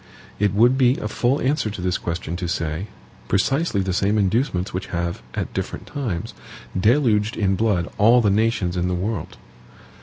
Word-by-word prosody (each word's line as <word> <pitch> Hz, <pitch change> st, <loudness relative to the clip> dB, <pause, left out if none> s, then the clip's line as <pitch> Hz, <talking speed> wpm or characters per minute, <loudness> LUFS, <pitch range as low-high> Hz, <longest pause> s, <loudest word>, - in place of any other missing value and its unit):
It 100 Hz, -1 st, +1 dB
would 120 Hz, +5 st, +4 dB
be 125 Hz, 0 st, +4 dB
a -, -, -3 dB
full 125 Hz, +6 st, +1 dB
answer 135 Hz, -3 st, +1 dB
to 100 Hz, -, -7 dB
this 90 Hz, 0 st, -1 dB
question 85 Hz, 0 st, -4 dB
to 90 Hz, -1 st, -3 dB
say 85 Hz, +1 st, -2 dB, 0.4 s
precisely 120 Hz, -, +1 dB
the 95 Hz, -1 st, -1 dB
same 100 Hz, +4 st, +1 dB
inducements 100 Hz, -1 st, 0 dB
which 90 Hz, +1 st, -3 dB
have, 85 Hz, 0 st, -3 dB
at -, -, -3 dB
different -, -, -4 dB
times, 115 Hz, -12 st, -4 dB, 0.4 s
deluged 110 Hz, +1 st, +2 dB
in 95 Hz, -2 st, +2 dB
blood 95 Hz, -4 st, +1 dB
all 115 Hz, +4 st, +6 dB
the 105 Hz, -4 st, +3 dB
nations 105 Hz, -4 st, +1 dB
in 90 Hz, 0 st, 0 dB
the 90 Hz, -, 0 dB
world. 95 Hz, -1 st, -3 dB
100 Hz, 175 wpm, -22 LUFS, 90-115 Hz, 0.4 s, all